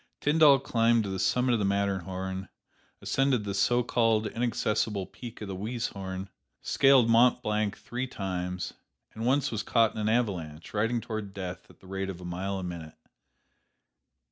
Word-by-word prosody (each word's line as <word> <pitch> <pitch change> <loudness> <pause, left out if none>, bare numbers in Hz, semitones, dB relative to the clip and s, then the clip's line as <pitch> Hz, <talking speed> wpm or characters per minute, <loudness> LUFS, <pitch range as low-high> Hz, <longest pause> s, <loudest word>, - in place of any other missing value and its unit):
Tyndall 145 -1 +6
climbed 115 -3 +2
to 100 - -4
the 95 - -3
summit 125 +6 +2
of 115 - +2
the - - 0
Matterhorn, 95 -1 -2 0.5
ascended 135 -4 +1
the 100 -1 -3
so 120 +5 +2
called 115 -2 +2
inaccessible 110 -3 -1
peak 120 +2 -10
of 105 - -5
the 95 - -4
Weisshorn, 100 -3 -4 0.3
scaled 135 -4 +4
Mont 115 +2 +4
Blanc 105 -1 0
three 125 +2 -4
times, 90 -5 -4 0.4
and 110 +2 -3
once 140 +2 +2
was 110 -2 -2
caught 115 0 +2
in - - -6
an 105 - +1
avalanche, 90 -9 -2
riding 115 +3 +1
toward 110 -4 -5
death 95 -2 -6
at - - -20
the - - -17
rate 95 0 -3
of 90 -2 -6
a 90 - -9
mile 95 +3 -3
a 95 - -4
minute. 85 -3 -7
105 Hz, 170 wpm, -28 LUFS, 95-120 Hz, 0.5 s, Tyndall